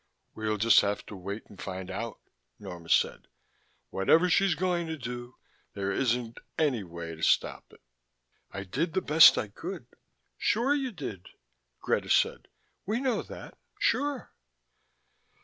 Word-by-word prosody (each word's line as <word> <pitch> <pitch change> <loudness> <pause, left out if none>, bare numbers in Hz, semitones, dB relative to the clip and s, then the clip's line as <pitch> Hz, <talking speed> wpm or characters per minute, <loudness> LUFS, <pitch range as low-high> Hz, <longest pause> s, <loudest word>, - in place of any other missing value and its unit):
"We'll 110 -1 -2
just 110 0 +6
have 100 0 -2
to 105 - -9
wait 100 +3 -6
and 100 - -14
find 95 -1 -5
out," - - -4 0.4
Norma 85 -2 -9
said. - - +2 0.6
"Whatever 165 - +3
she's 195 -1 +4
going 175 0 0
to 160 0 -4
do, 120 -1 -7 0.4
there 100 0 -1
isn't 120 +1 -1 0.2
any 135 -9 +1
way 85 -2 -7
to 80 - -11
stop - - +1
it. - - -19 0.7
I 100 - -6
did 150 - -2
the 190 - +2
best 160 0 +8
I 110 - -1
could - - -7 0.3
" - - -48
"Sure 240 +6 +3
you 270 -3 -1
did," 120 - -7 0.5
Greta - - 0
said. - - +2 0.4
"We 215 +4 -1
know 260 -3 0
that. - - -11 0.2
Sure." 285 - 0
120 Hz, 150 wpm, -29 LUFS, -, 0.7 s, best